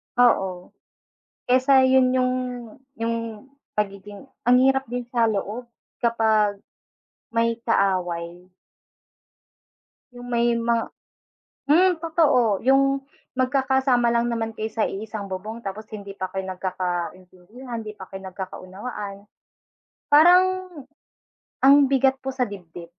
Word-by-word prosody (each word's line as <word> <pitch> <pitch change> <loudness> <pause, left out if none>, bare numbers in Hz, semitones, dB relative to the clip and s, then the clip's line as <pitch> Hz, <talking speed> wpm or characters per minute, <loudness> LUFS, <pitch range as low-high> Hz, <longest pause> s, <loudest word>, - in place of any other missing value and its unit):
Oo, 190 -7 +2 0.8
kaysa 260 +2 +5
'yun 260 -1 +4
'yung 255 0 +2 0.7
'yung 230 +1 -4 0.2
pagiging, 205 +3 -5 0.2
ang 245 +1 +5
hirap 270 0 +3
din 245 0 -5
sa 235 -2 +1
loob 215 +2 -2 0.4
kapag 220 -3 +2 0.7
may 230 0 +1
kaaway. 180 -4 0 1.7
'Yung 245 0 -10
may 235 0 +2
mga 230 0 0 0.8
hmm, 365 +4 +6
totoo. 285 - +2
'Yung 275 +1 +3 0.3
magkakasama 260 -2 +2
lang 235 0 +1
naman 225 -1 -2
kayo 220 +1 -4
sa 220 0 0
iisang 210 0 -5
bubong, 210 +5 -6
tapos 210 +3 -6
hindi 200 -2 -8
pa 185 -1 -4
kayo 190 0 -4
nagkakaintindihan, 185 +5 -5
hindi 215 - -7
pa 190 - -9
kayo 195 0 -7
nagkakaunawaan 195 +2 -7 0.9
parang 365 +4 +5 0.9
ang 280 +1 +7
bigat 270 0 +2
po 265 0 -5
sa 260 - -5
dibdib. 175 -3 -10
230 Hz, 110 wpm, -23 LUFS, 195-260 Hz, 1.7 s, ang